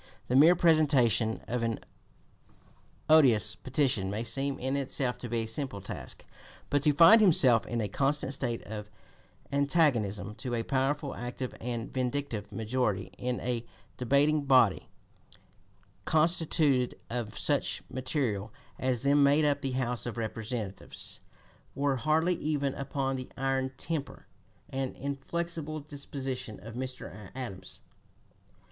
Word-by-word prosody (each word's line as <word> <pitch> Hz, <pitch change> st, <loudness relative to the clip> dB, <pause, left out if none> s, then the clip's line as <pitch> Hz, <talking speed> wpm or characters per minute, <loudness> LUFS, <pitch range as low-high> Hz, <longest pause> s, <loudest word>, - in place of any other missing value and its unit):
The 125 Hz, -, +2 dB
mere 160 Hz, +6 st, +7 dB
presentation 140 Hz, -, +3 dB
of 125 Hz, 0 st, -1 dB
an 115 Hz, -1 st, -1 dB, 1.3 s
odious 125 Hz, -9 st, +5 dB
petition 130 Hz, -7 st, 0 dB
may 105 Hz, +3 st, -2 dB
seem 135 Hz, +4 st, -1 dB
in 130 Hz, +2 st, -2 dB
itself 135 Hz, -2 st, -1 dB
to 120 Hz, -, -6 dB
be 115 Hz, -1 st, 0 dB
a -, -, -4 dB
simple 110 Hz, -2 st, -3 dB
task; 95 Hz, -, -8 dB, 0.5 s
but 145 Hz, 0 st, +3 dB
to 150 Hz, 0 st, +4 dB
find 170 Hz, +9 st, +8 dB
himself 130 Hz, -, +5 dB
in 120 Hz, -, -2 dB
a 105 Hz, -, -1 dB
constant 135 Hz, +5 st, 0 dB
state 120 Hz, -4 st, -3 dB
of 105 Hz, -1 st, -7 dB, 0.6 s
antagonism 140 Hz, -, +1 dB
to 125 Hz, -2 st, -3 dB
a 115 Hz, -, -1 dB
powerful, 135 Hz, +2 st, 0 dB
active, 125 Hz, +1 st, -5 dB
and 120 Hz, -1 st, -4 dB
vindictive 125 Hz, -5 st, -2 dB
majority 110 Hz, -3 st, -1 dB
in 125 Hz, 0 st, -2 dB
a 120 Hz, -2 st, -2 dB, 0.3 s
debating 140 Hz, +4 st, +2 dB
body, 130 Hz, -8 st, +4 dB, 1.2 s
constituted 155 Hz, -5 st, +2 dB
of 115 Hz, -3 st, -4 dB
such -, -, 0 dB
material 125 Hz, -6 st, -2 dB, 0.3 s
as 130 Hz, -2 st, 0 dB
then 140 Hz, +1 st, +4 dB
made 145 Hz, +2 st, +5 dB
up 145 Hz, -1 st, +1 dB
the 135 Hz, -1 st, -2 dB
House 125 Hz, -2 st, -1 dB
of 120 Hz, -, -5 dB
Representatives, 110 Hz, -2 st, -4 dB, 0.6 s
wore 140 Hz, -1 st, +1 dB
hardly 155 Hz, +6 st, +2 dB
even 145 Hz, -3 st, -1 dB
upon 135 Hz, -1 st, -2 dB
the 130 Hz, -, -7 dB
iron 135 Hz, 0 st, 0 dB
temper 140 Hz, -5 st, -4 dB, 0.4 s
and 135 Hz, -1 st, -3 dB
inflexible 155 Hz, +3 st, -4 dB
disposition 140 Hz, -6 st, -6 dB
of 115 Hz, +1 st, -10 dB
Mr. 125 Hz, -6 st, -6 dB
Adams. 120 Hz, -8 st, -7 dB
130 Hz, 130 wpm, -30 LUFS, 115-145 Hz, 1.3 s, find